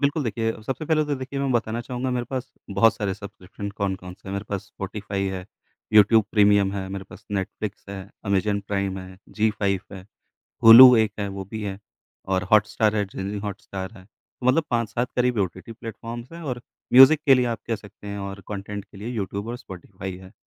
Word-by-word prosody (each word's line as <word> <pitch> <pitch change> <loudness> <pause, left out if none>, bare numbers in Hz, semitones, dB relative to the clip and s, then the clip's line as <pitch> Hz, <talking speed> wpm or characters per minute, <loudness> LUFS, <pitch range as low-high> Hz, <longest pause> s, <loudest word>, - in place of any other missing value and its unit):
बिल्कुल, 145 +2 +1
देखिए 115 0 -1
सबसे 135 +6 -4
पहले 155 -1 +2
तो 150 -1 -1
देखिए, 130 +1 -5
मैं 140 - 0
बताना 115 -1 0
चाहूँगा 125 +2 -3
मेरे 125 -1 -1
पास 130 -2 -4 0.3
बहुत 115 +1 +6
सारे 105 -4 -2
सब्सक्रिप्शन 100 0 -8
कौन-कौन 95 -3 -4
से 95 0 -14
हैं - - -4
मेरे 100 +1 -3
पास, 100 -2 -2
स्पॉटिफ़ाई 100 0 -4
है, 90 0 -6 0.5
यूट्यूब 110 +1 +6
प्रीमियम 100 -2 +4
है, 95 -1 -4
मेरे 95 0 -5
पास 105 - -13
नेटफ्लिक्स 100 +1 -4
है, 100 -1 -6 0.2
अमेज़न 100 0 +1
प्राइम 100 -1 -1
है, 95 0 -10
ज़ी-फाइव 105 -3 0
है, 95 -1 -10 0.6
हुलु 125 +3 +11
एक 110 -1 +2
है 100 -1 -2
वो 95 - -4
भी 110 -1 -5
है 100 -1 -4 0.5
और 95 -1 +2
हॉटस्टार 110 0 +3
है, 105 - +2
डिज़नी 100 +1 -5
हॉटस्टार 100 -2 -6
है। 95 - -16 0.4
मतलब 130 +6 +4
5-7 120 +1 0
करीब 125 -2 +2
ये 100 - +4
ओटीटी 95 +4 -9
प्लेटफ़ॉर्म्स 115 +3 -8
हैं 170 0 -9
और 125 -5 -4 0.3
म्यूज़िक 135 +4 +9
के 135 - +8
लिए 125 -1 +2
आप 115 -2 -2
कह 115 - -1
सकते 105 0 -14
हैं 100 0 -5
और 100 0 -6
कंटेंट 100 0 -5
के - - -18
लिए 105 +4 -6
यूट्यूब 100 -3 -3
और 120 - -3
स्पॉटिफ़ाई 95 -3 -8
है। 95 +1 -13
105 Hz, 200 wpm, -24 LUFS, 100-120 Hz, 0.6 s, हुलु